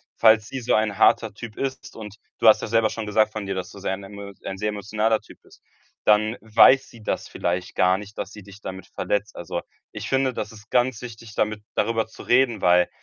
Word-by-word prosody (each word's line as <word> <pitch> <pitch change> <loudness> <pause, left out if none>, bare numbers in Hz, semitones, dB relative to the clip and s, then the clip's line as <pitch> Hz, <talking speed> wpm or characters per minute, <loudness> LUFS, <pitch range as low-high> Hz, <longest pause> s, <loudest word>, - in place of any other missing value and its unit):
falls 110 -1 +5
sie 135 - -5
so 115 - 0
ein 110 -2 +1
harter - - +4
Typ 115 -2 -9
ist, 135 0 -4
und 105 -2 -9 0.2
du - - +3
hast 110 - +7
ja - - -3
selber 115 0 +3
schon 115 -2 -5
gesagt 110 +1 +2
von 110 -2 -5
dir, 95 0 -3
dass 95 - -5
du 100 - -11
sehr 95 - -2
ein 100 +1 -6
emo 100 0 -9
ein 95 - -4
sehr 105 +2 -1
emotionaler 105 +2 0
Typ - - -17
bist, - - -21 0.4
dann 110 +2 +3
weiß 115 +5 +5
sie 115 - -15
das - - -2
vielleicht 90 +1 -3
gar 90 0 +4
nicht, 105 +1 -11
dass 95 - -4
sie 105 -2 -11
dich 100 +1 -14
damit 95 -1 -7
verletzt. 105 +1 -2
Also, - - -4 0.3
ich - - -6
finde, 135 -1 +1
das - - -4
ist 105 -2 -15
ganz 125 -2 +1
wichtig, 115 -2 -9
damit 110 0 0
darüber 110 +1 +1
zu - - -12
reden, 120 -4 +3
weil 90 0 +4
110 Hz, 230 wpm, -24 LUFS, 100-115 Hz, 0.4 s, hast